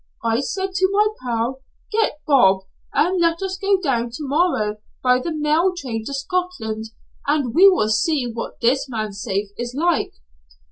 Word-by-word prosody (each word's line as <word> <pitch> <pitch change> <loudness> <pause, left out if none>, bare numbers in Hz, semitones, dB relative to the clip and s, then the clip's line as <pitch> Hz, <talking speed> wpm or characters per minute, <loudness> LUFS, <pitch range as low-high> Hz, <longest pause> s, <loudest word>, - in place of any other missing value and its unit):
I 230 0 +1
said 380 +7 -3
to 375 +1 +2
my 420 +1 +3
pal, 245 +1 -2 0.3
'Get 430 -9 0
Bob, 195 -10 +5 0.3
and 360 +3 +2
let 335 +2 +2
us 380 -1 -2
go 395 -1 +3
down 245 -9 0
to 275 - -7
morrow 270 -9 +1 0.3
by 250 0 +4
the 335 +6 -3
mail 310 +4 +2
train 235 -8 -4
to 280 - -5
Scotland, 275 -8 -3 0.4
and 285 -5 +1
we 385 +6 +8
will 280 - +2
see 250 +6 +1
what 230 -1 -6
this 260 +3 +2
man's 215 -4 -4
safe 200 +1 -2
is 240 +1 -4
like.' 340 0 +1
275 Hz, 170 wpm, -21 LUFS, 230-355 Hz, 0.4 s, we